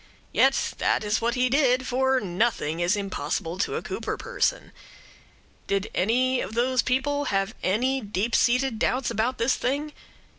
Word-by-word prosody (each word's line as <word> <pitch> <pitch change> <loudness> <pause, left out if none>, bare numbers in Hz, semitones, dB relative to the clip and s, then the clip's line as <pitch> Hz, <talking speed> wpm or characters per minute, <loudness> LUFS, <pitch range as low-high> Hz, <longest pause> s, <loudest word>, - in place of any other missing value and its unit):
Yet - - +2
that - - +1
is 210 +1 0
what 235 +1 0
he 250 0 +2
did; 260 -1 +2
for 265 +1 +2
nothing 185 -5 -1
is 175 +4 +2
impossible 185 -3 -3
to - - -1
a - - -3
Cooper - - -4
person. 485 +1 -1 1.0
Did 200 0 -1
any 250 +6 +1
of 195 +4 -6
those 250 +1 +2
people 285 +3 0
have 195 +2 0
any 255 +8 +1
deep 210 +2 -2
seated 250 -1 +2
doubts 255 +1 0
about 235 +5 -1
this 235 +3 +2
thing? 290 +4 -2
240 Hz, 155 wpm, -25 LUFS, 200-260 Hz, 1.0 s, Yet